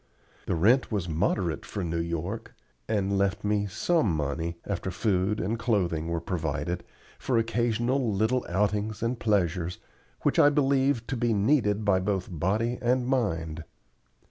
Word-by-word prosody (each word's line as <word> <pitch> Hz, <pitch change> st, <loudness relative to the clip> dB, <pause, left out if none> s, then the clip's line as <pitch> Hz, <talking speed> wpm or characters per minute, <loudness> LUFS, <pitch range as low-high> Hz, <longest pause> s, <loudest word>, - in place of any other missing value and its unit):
The -, -, +1 dB
rent 115 Hz, +12 st, +3 dB
was 100 Hz, -5 st, -1 dB
moderate 85 Hz, +1 st, 0 dB
for 100 Hz, -, -5 dB
New 85 Hz, -1 st, -2 dB
York, 85 Hz, +6 st, -4 dB, 0.3 s
and 100 Hz, -2 st, 0 dB
left 100 Hz, +1 st, 0 dB
me 105 Hz, 0 st, +1 dB
some 115 Hz, -, +1 dB
money, 80 Hz, +3 st, -2 dB
after 95 Hz, -2 st, -3 dB
food 95 Hz, +1 st, 0 dB
and 110 Hz, +6 st, -1 dB
clothing 90 Hz, -9 st, 0 dB
were 85 Hz, 0 st, -1 dB
provided, 80 Hz, 0 st, -3 dB, 0.4 s
for 125 Hz, -, 0 dB
occasional 120 Hz, +2 st, +1 dB
little 110 Hz, +5 st, +1 dB
outings 105 Hz, +3 st, 0 dB
and 115 Hz, +1 st, -1 dB
pleasures, 90 Hz, -5 st, 0 dB, 0.5 s
which -, -, +2 dB
I 145 Hz, -, +8 dB
believe 135 Hz, -4 st, +2 dB
to 135 Hz, -, -3 dB
be 120 Hz, -2 st, +1 dB
needed 105 Hz, -2 st, +2 dB
by 100 Hz, -2 st, +4 dB
both 95 Hz, -1 st, -1 dB
body 105 Hz, +9 st, 0 dB
and 125 Hz, +1 st, +2 dB
mind. 85 Hz, -, -1 dB
100 Hz, 145 wpm, -27 LUFS, 85-115 Hz, 0.5 s, I